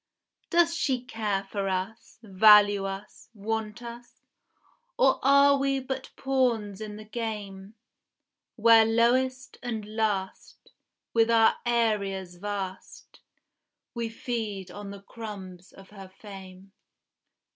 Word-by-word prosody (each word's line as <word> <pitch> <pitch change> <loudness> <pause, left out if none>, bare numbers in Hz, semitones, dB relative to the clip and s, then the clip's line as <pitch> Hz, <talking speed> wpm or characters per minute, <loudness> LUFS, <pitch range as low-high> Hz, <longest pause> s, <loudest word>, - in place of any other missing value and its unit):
Doth 340 -1 +3
she 260 -7 -1
care 215 -5 -2
for 195 0 -3
us, 190 +5 -4
value 205 0 +6
us, 195 +1 -8
want 220 +2 -4
us, 235 +1 -10 0.8
Or 265 - +4
are 280 +1 +5
we 275 0 +1
but 265 0 -5
pawns 235 -7 0
in 210 -1 -6
the 215 0 -10
game; 210 -3 -6 0.8
Where 230 -1 +6
lowest 255 +3 +1
and 225 -4 -4
last, 205 -4 -3 0.4
with 230 0 +3
our 225 -1 +4
areas 200 -6 0
vast, 195 -1 -7 0.7
We 235 -1 -3
feed 220 -5 -5
on 205 +1 -8
the 200 0 -10
crumbs 195 -5 -9
of 195 0 -16
her 195 -2 -11
fame? 195 -1 -12
215 Hz, 115 wpm, -27 LUFS, 195-235 Hz, 0.8 s, value